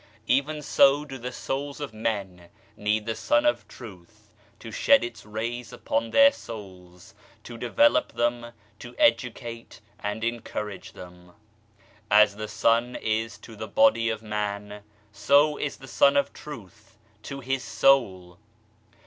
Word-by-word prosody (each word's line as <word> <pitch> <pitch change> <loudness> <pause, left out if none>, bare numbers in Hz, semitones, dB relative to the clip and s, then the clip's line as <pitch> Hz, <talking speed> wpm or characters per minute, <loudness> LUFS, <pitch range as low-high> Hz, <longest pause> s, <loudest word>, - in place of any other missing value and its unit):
Even 150 +5 0
so 140 +1 +4
do 135 -2 -8
the 125 +1 -5
souls 140 +3 -4
of 145 -6 -6
men 100 -6 -4 0.3
need 105 +1 -1
the 115 - -2
Sun 295 - +1
of 300 - +1
Tr 125 - -11 0.2
ath 105 +3 -28 0.3
to 115 - -10
shed 280 - +4
Its 110 -3 -7
rays 115 +2 -5
upon 115 0 -2
their 280 - +6
souls, 95 - -11 0.3
to 120 - -9
develop 290 - +2
them, 120 0 -1 0.3
to 120 0 -11
educate 115 -1 0 0.2
and 105 +2 -4
encourage 105 -4 -5
them. 90 -1 -13 0.8
As 105 0 +5
the 110 +1 -5
sun 115 +3 +1
is 110 0 -2
to 115 - -13
the - - -7
body 275 - +3
of 110 0 -4
a - - -15
man, 105 -1 -4 0.3
so 140 +8 +3
is 145 - -4
the 135 - -13
Sun 140 +2 +4
of 140 - +1
Truth 110 - -12 0.2
to 140 +5 -7
his 135 0 -2
soul. 95 -13 +2
115 Hz, 150 wpm, -26 LUFS, 105-135 Hz, 0.8 s, their